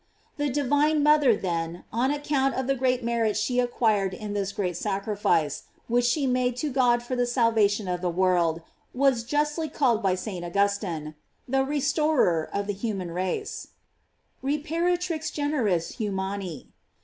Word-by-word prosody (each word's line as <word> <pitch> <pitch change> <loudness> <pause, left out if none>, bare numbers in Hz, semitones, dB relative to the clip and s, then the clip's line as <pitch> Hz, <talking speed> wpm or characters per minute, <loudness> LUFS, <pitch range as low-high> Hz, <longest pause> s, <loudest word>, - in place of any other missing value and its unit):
The 290 0 0
divine 290 +2 +2
mother 295 -5 +5
then, 170 -3 -3
on 245 +4 +1
account 285 -2 0
of 260 - -1
the 275 - +2
great 255 -1 0
merit 230 -2 0
she 245 +4 0
acquired 215 -6 +1
in 210 0 -6
this 200 -1 -1
great 185 -4 -2
sacrifice, 195 -6 0 0.2
which 245 +1 +2
she 275 +4 +1
made 250 -1 +1
to 295 +3 -2
God 245 -2 +3
for 255 +1 -3
the 245 -1 +1
salvation 225 -4 +2
of 180 -1 -2
the 180 - 0
world, 170 -2 +1 0.3
was 260 -3 +3
justly 295 +5 -1
called 240 -6 +1
by 190 -2 +2
St. 185 -2 -5
Augustine: 175 -4 -1 0.3
The 270 +1 +2
restorer 280 - +1
of 200 0 -2
the 205 - -2
human 195 -4 -4
race: 185 - -3 0.4
" - - -44
Reparatrix 330 +3 -1
generis 245 - -1
humani." 195 - -4
235 Hz, 150 wpm, -26 LUFS, 195-275 Hz, 0.4 s, mother